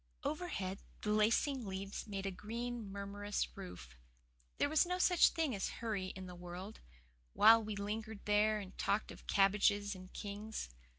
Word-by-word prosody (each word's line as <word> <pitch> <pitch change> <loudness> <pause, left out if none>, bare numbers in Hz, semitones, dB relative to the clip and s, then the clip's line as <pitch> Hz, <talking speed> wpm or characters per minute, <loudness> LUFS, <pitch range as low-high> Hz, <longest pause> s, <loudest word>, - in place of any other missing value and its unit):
Overhead 280 - -2 0.2
the 210 - +1
lacing 230 +4 +2
leaves 195 +3 -5
made 195 -2 -4
a 195 - -1
green, 230 +2 -5
murmurous 200 +1 -3
roof. 120 - -9 0.6
There - - +3
was 310 +1 +4
no 360 0 -1
such 360 -1 +6
thing 320 -5 0
as 195 - -1
hurry 215 -5 -3
in 190 0 -7
the 180 - -8
world, 180 +4 -8 0.5
while 225 +1 +8
we 215 -1 -4
lingered 215 +1 -4
there 210 +1 +4
and 195 -2 -7
talked 205 +2 +1
of - - -13
"cabbages 205 +1 +3
and 185 -1 -11
kings." 210 - -5
205 Hz, 160 wpm, -36 LUFS, 195-225 Hz, 0.6 s, while